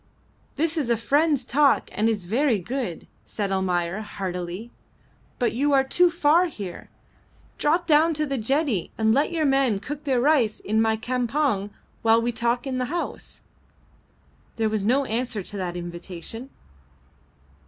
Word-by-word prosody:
"This 325 Hz, +2 st, 0 dB
is 280 Hz, -6 st, 0 dB
a 235 Hz, -, +3 dB
friend's 285 Hz, +3 st, +2 dB
talk, 280 Hz, +2 st, +3 dB
and 215 Hz, +2 st, +1 dB
is 205 Hz, -5 st, -2 dB
very 240 Hz, +5 st, +2 dB
good," 210 Hz, -1 st, -4 dB, 0.2 s
said 200 Hz, -2 st, -4 dB
Almayer, 185 Hz, 0 st, 0 dB
heartily. 190 Hz, +1 st, -5 dB, 0.7 s
"But 245 Hz, -, 0 dB
you 285 Hz, +5 st, +1 dB
are 270 Hz, -1 st, +5 dB
too 350 Hz, +7 st, +3 dB
far 335 Hz, +1 st, +3 dB
here. 200 Hz, -, -8 dB, 0.7 s
Drop 335 Hz, +4 st, +2 dB
down 315 Hz, +1 st, +4 dB
to 305 Hz, +1 st, 0 dB
the 275 Hz, -3 st, -2 dB
jetty 265 Hz, -, 0 dB
and 220 Hz, 0 st, +3 dB
let 280 Hz, +6 st, +2 dB
your 325 Hz, -2 st, 0 dB
men 270 Hz, -7 st, +2 dB
cook 295 Hz, +7 st, -7 dB
their 265 Hz, -3 st, +2 dB
rice 250 Hz, -5 st, +2 dB
in 220 Hz, +2 st, 0 dB
my 220 Hz, 0 st, +2 dB
campong 245 Hz, -2 st, 0 dB, 0.3 s
while 225 Hz, 0 st, +5 dB
we 235 Hz, +1 st, 0 dB
talk 235 Hz, +2 st, 0 dB
in 260 Hz, -2 st, -2 dB
the 250 Hz, -, 0 dB
house." 340 Hz, +7 st, -5 dB, 1.1 s
There 220 Hz, -1 st, 0 dB
was 215 Hz, -2 st, -1 dB
no 260 Hz, +6 st, +2 dB
answer 230 Hz, -3 st, -2 dB
to 205 Hz, -, -6 dB
that 180 Hz, -2 st, -3 dB
invitation. 175 Hz, +7 st, -7 dB
240 Hz, 155 wpm, -24 LUFS, 210-285 Hz, 1.1 s, are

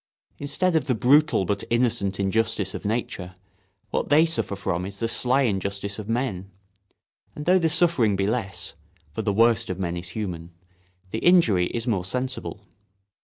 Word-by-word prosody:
Instead 155 Hz, +5 st, 0 dB
of 160 Hz, -, +1 dB
the 130 Hz, -, +1 dB
brutal 140 Hz, -1 st, +4 dB
but 100 Hz, +2 st, -2 dB
innocent 115 Hz, -5 st, 0 dB
injustice 105 Hz, 0 st, 0 dB
of -, -, -7 dB
nature, 100 Hz, -4 st, -3 dB, 0.6 s
what -, -, -1 dB
they 155 Hz, +3 st, +6 dB
suffer 160 Hz, -11 st, -1 dB
from 90 Hz, -2 st, -2 dB
is 100 Hz, +1 st, -7 dB
the 115 Hz, -, -1 dB
sly 130 Hz, +4 st, +2 dB
injustice 100 Hz, -2 st, -2 dB
of 105 Hz, 0 st, -7 dB
men; 115 Hz, -6 st, -2 dB, 0.9 s
and 150 Hz, -, -6 dB
though 185 Hz, +1 st, +5 dB
the 165 Hz, -2 st, +2 dB
suffering 160 Hz, -, +3 dB
be 95 Hz, 0 st, 0 dB
less—for 85 Hz, -7 st, -5 dB
the 105 Hz, -, 0 dB
worst 115 Hz, +1 st, +3 dB
of 95 Hz, -, -3 dB
men 90 Hz, -2 st, -2 dB
is 85 Hz, 0 st, -6 dB
human—the 90 Hz, +1 st, -8 dB
injury 115 Hz, -, +4 dB
is 115 Hz, -1 st, -4 dB
more 105 Hz, -7 st, 0 dB
sensible. 125 Hz, +7 st, -4 dB
105 Hz, 160 wpm, -24 LUFS, 95-125 Hz, 0.9 s, they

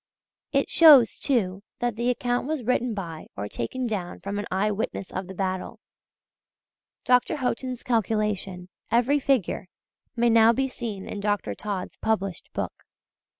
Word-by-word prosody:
It -, -, +2 dB
shows, 290 Hz, -8 st, +7 dB
too, 200 Hz, -8 st, 0 dB, 0.2 s
that 240 Hz, -2 st, -1 dB
the 235 Hz, +2 st, 0 dB
account 245 Hz, +1 st, 0 dB
was 305 Hz, -4 st, -2 dB
written 245 Hz, -1 st, 0 dB
by 165 Hz, -5 st, -6 dB
or 100 Hz, +1 st, -3 dB
taken 250 Hz, -, -3 dB
down 195 Hz, -6 st, -3 dB
from 200 Hz, +1 st, -3 dB
an 205 Hz, -, -4 dB
eye 200 Hz, +3 st, +1 dB
witness 200 Hz, -2 st, -3 dB
of 185 Hz, 0 st, -4 dB
the 190 Hz, -, -8 dB
battle. 185 Hz, -1 st, -3 dB, 1.3 s
Dr. 250 Hz, +5 st, +3 dB
Haughton's 255 Hz, -2 st, -2 dB
calculation 210 Hz, -5 st, -1 dB, 0.2 s
every 245 Hz, +5 st, +3 dB
figure 260 Hz, -9 st, 0 dB, 0.5 s
may 235 Hz, 0 st, +3 dB
now 225 Hz, 0 st, +6 dB
be 270 Hz, +3 st, 0 dB
seen 225 Hz, -6 st, -5 dB
in 205 Hz, -, -5 dB
Dr. 205 Hz, -, -1 dB
Todd's 195 Hz, -, -5 dB
published 195 Hz, -5 st, -2 dB
book. -, -, -3 dB
220 Hz, 150 wpm, -26 LUFS, 190-250 Hz, 1.3 s, shows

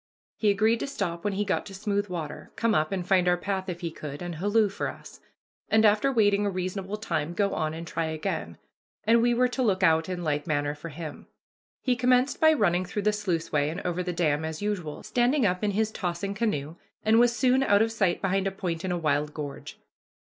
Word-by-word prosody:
He 215 Hz, -, +2 dB
agreed 220 Hz, +3 st, +3 dB
to -, -, -3 dB
stop 175 Hz, -10 st, -3 dB
when 205 Hz, -, 0 dB
he 205 Hz, +2 st, -1 dB
got -, -, 0 dB
to 195 Hz, -, -9 dB
smooth 205 Hz, 0 st, -1 dB
water, 165 Hz, -5 st, -6 dB
come 230 Hz, -1 st, +1 dB
up 155 Hz, -4 st, +1 dB
and 185 Hz, -2 st, -3 dB
find 185 Hz, -2 st, +3 dB
our 175 Hz, 0 st, +4 dB
path 190 Hz, +1 st, -3 dB
if 175 Hz, 0 st, -5 dB
he 170 Hz, -2 st, -3 dB
could, 150 Hz, 0 st, -7 dB
and 175 Hz, -1 st, -4 dB
halloo 205 Hz, +6 st, +2 dB
for 200 Hz, -, -3 dB
us, -, -, -10 dB, 0.5 s
and 220 Hz, 0 st, +4 dB
after 215 Hz, +6 st, +4 dB
waiting 205 Hz, -4 st, +3 dB
a 205 Hz, -, +1 dB
reasonable 190 Hz, +2 st, -3 dB
time 175 Hz, -6 st, -2 dB
go 200 Hz, 0 st, +1 dB
on 155 Hz, 0 st, -1 dB
and 165 Hz, +1 st, -6 dB
try 165 Hz, 0 st, -2 dB
again 150 Hz, -, -3 dB, 0.5 s
and 230 Hz, +2 st, +4 dB
we 240 Hz, 0 st, +3 dB
were 250 Hz, +1 st, +4 dB
to 260 Hz, -, -3 dB
look 195 Hz, -6 st, +1 dB
out 160 Hz, -1 st, +3 dB
in 180 Hz, -1 st, -3 dB
like 150 Hz, -1 st, -1 dB
manner 145 Hz, -2 st, 0 dB
for 150 Hz, +3 st, -8 dB
him. 155 Hz, +1 st, -8 dB, 0.6 s
He 250 Hz, -2 st, +2 dB
commenced 250 Hz, +2 st, +2 dB
by 315 Hz, 0 st, +7 dB
running 185 Hz, -, +2 dB
through 200 Hz, +3 st, -4 dB
the 210 Hz, +1 st, +2 dB
sluiceway 165 Hz, -7 st, 0 dB
and 165 Hz, -, -4 dB
over 180 Hz, 0 st, -2 dB
the 180 Hz, 0 st, -2 dB
dam, 160 Hz, -3 st, +1 dB
as 160 Hz, 0 st, -4 dB
usual, 190 Hz, -8 st, -3 dB
standing 250 Hz, +1 st, +2 dB
up 180 Hz, 0 st, 0 dB
in 210 Hz, -, +2 dB
his 215 Hz, +2 st, 0 dB
tossing 190 Hz, 0 st, -3 dB
canoe, 175 Hz, -8 st, -2 dB, 0.3 s
and 220 Hz, +1 st, +5 dB
was 240 Hz, 0 st, +4 dB
soon 255 Hz, +1 st, +3 dB
out 205 Hz, -5 st, +4 dB
of 225 Hz, -, -1 dB
sight 195 Hz, -6 st, 0 dB
behind 195 Hz, 0 st, +1 dB
a -, -, -1 dB
point 175 Hz, -4 st, -4 dB
in 185 Hz, -, -2 dB
a 175 Hz, -, 0 dB
wild 150 Hz, -2 st, 0 dB
gorge. 145 Hz, -2 st, -7 dB
190 Hz, 230 wpm, -27 LUFS, 165-215 Hz, 0.6 s, by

